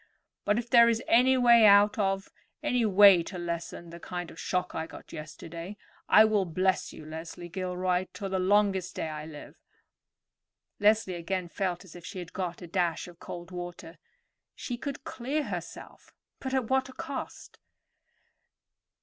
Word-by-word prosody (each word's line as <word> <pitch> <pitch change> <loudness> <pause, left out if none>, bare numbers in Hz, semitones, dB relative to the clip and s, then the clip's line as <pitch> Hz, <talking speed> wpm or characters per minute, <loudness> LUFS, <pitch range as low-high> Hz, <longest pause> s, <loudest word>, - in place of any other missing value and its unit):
But 205 - +2
if 240 0 -2
there 235 0 +7
is 230 0 0
any 255 +3 +5
way 235 -2 +6
out 205 +1 +6
of, 195 -1 -1 0.3
any 250 -6 +2
way 200 -2 +7
to 180 +3 -7
lessen 170 0 -5
the 170 - -9
kind 175 0 -6
of - - -13
shock 180 0 -2
I 160 0 -3
got - - -13
yesterday, 165 +5 -8 0.3
I 215 - +8
will 210 -3 +2
bless 185 +2 0
you, 155 - -11
Leslie 160 +2 -8
Gilroy, 180 0 -1
to 200 - -5
the 190 -1 -1
longest 190 -1 +2
day 160 - -3
I 155 0 -6
live." 150 -2 -11 1.2
Leslie 210 -2 +3
again 175 +1 -3
felt 180 -1 -3
as 180 - -14
if 175 - -11
she 185 - -8
had 175 -1 -7
got 180 -1 -4
a - - -8
dash 175 -1 -1
of 175 -1 -14
cold 175 0 -8
water. 175 -1 -8 0.6
She 245 - -4
could 275 +3 -6
clear 275 +5 -2
herself, - - -8 0.3
but 265 0 -3
at 255 -4 0
what 265 +1 +1
a - - -11
cost! 270 +1 -7
185 Hz, 165 wpm, -29 LUFS, 175-215 Hz, 1.2 s, I